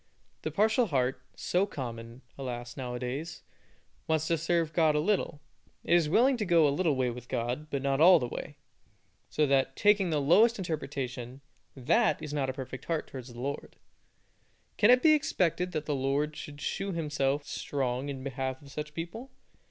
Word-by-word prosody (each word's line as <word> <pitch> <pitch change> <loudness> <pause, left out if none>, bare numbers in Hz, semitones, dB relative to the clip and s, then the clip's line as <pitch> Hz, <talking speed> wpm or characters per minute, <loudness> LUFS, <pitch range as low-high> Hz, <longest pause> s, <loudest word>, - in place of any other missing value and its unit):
The - - -2
partial 220 +3 +2
heart, 130 -4 0
so 185 +3 0
common, 120 - -7
alas, 120 -2 -6
now 125 -2 -5
a - - -4
days, 135 +6 -5 0.6
wants 160 -1 +1
to 165 - +2
serve 165 -1 0
God 160 -3 +3
a - - +3
little. 170 -4 0 0.4
It - - +1
is 170 -3 +4
willing 250 - +4
to 220 - -1
go 170 -4 +5
a 140 - +1
little 160 -2 +1
way 130 -2 0
with 120 0 -10
God, 125 +5 -3
but 140 -1 -3
not 140 +1 +1
all 180 +2 +9
the 125 - -2
way; - - -7 0.7
so 150 - +2
that, 135 -1 +2
taking 205 -3 +3
the 155 -2 +1
lowest 210 +12 +5
interpretation, 135 - -4 0.3
that 145 - +2
is 150 -1 -6
not 140 -3 0
a - - -2
perfect 130 -1 -7
heart 165 -2 -1
towards 130 -2 -8
the 120 - -11
Lord. 140 +3 -5 1.0
Can 210 - +4
it 250 0 +6
be 315 -1 +7
expected 180 - 0
that 155 -1 -2
the 150 - -1
Lord 140 +3 0
should 145 -1 -9
shew 195 0 -2
Himself 145 -3 -1
strong 130 -1 -2
in 135 -2 -5
behalf 130 -1 -3
of 140 - -13
such 150 +1 -6
people? 175 +11 -6
145 Hz, 185 wpm, -29 LUFS, 130-170 Hz, 1.0 s, all